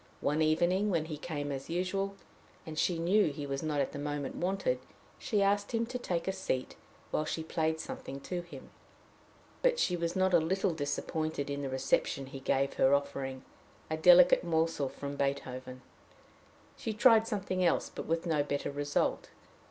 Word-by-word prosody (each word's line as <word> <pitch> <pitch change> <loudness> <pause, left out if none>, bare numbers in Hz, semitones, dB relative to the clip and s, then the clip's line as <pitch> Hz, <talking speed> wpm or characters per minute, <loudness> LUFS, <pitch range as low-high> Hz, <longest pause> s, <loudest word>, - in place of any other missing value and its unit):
One 150 +2 +1
evening 175 +6 +2
when 165 -5 +1
he 155 -2 -5
came 145 -3 -4
as 135 +1 -5
usual, 195 +3 -1 0.5
and 160 - -7
she 175 - +2
knew 185 +6 +3
he 145 -1 -4
was 135 -1 -3
not 155 -2 -1
at 135 - 0
the 145 - -6
moment 145 -1 -3
wanted, 195 - 0 0.4
she 210 -4 +1
asked 205 +2 +1
him 230 0 +1
to 250 +2 -5
take 175 -8 -2
a - - +2
seat 190 -9 -3 0.4
while 155 - +1
she 160 +1 -3
played 160 0 -1
something 135 -3 -6
to 180 +3 -3
him. 175 0 -12 0.9
But - - +3
she 180 - +2
was 170 0 -2
not 190 0 +2
a 175 - +7
little 185 +3 0
disappointed 145 0 -2
in 140 0 -3
the 140 - -3
reception 135 +1 0
he 135 0 -8
gave 135 +1 +1
her 135 +1 +5
offering 140 -2 -3 0.5
a - - +1
delicate 180 +2 +7
morsel 160 -4 0
from 140 +1 -6
Beethoven. 130 -2 -3 0.9
She 220 - -4
tried 225 0 +5
something 190 -4 -1
else, 170 - +2
but - - -6
with 165 +1 0
no 160 -4 +2
better 145 0 -2
result. 145 0 -1
160 Hz, 175 wpm, -31 LUFS, 140-185 Hz, 0.9 s, a